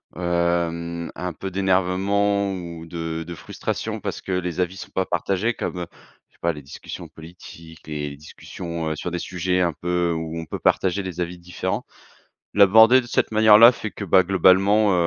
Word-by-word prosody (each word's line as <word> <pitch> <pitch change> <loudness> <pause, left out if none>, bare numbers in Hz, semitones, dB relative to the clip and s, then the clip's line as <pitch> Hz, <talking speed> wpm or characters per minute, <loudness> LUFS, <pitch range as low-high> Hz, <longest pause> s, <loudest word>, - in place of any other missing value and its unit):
hem 85 -1 -1
un 90 0 -4
peu 95 - -6
d'énervement 100 +2 +1
ou 85 -3 -7
de 80 -1 -4
de 85 - -6
frustration - - -4
parce - - -5
que 95 - -6
les 90 -1 -2
avis 90 +1 -1
sont - - -9
pas 95 - -1
partagés 95 +6 -1
comme, 90 - -4
heu, 85 - -4 0.4
je - - -39
sais - - -30
pas 85 0 0
les 75 - -9
discussions 70 - -9
politiques, 80 -1 -13
les 75 -2 -4
discussions, 85 +2 -6
heu, - - 0
sur 90 - -4
des 90 - -3
sujets 90 +1 -1
un 85 -3 +1
peu 90 0 -1
où 80 0 -4
on 80 - -6
peut - - -6
partager 95 +1 +1
des 90 -2 -7
avis 90 0 -3
différents. 90 0 -4 0.7
L'aborder 110 +5 +7
de 120 - -10
cette - - 0
manière-là 110 +2 +8
fait 110 -3 -6
que, 100 - -6
bah 95 0 +4
globalement, 95 +3 +4
90 Hz, 185 wpm, -23 LUFS, 85-95 Hz, 0.7 s, manière-là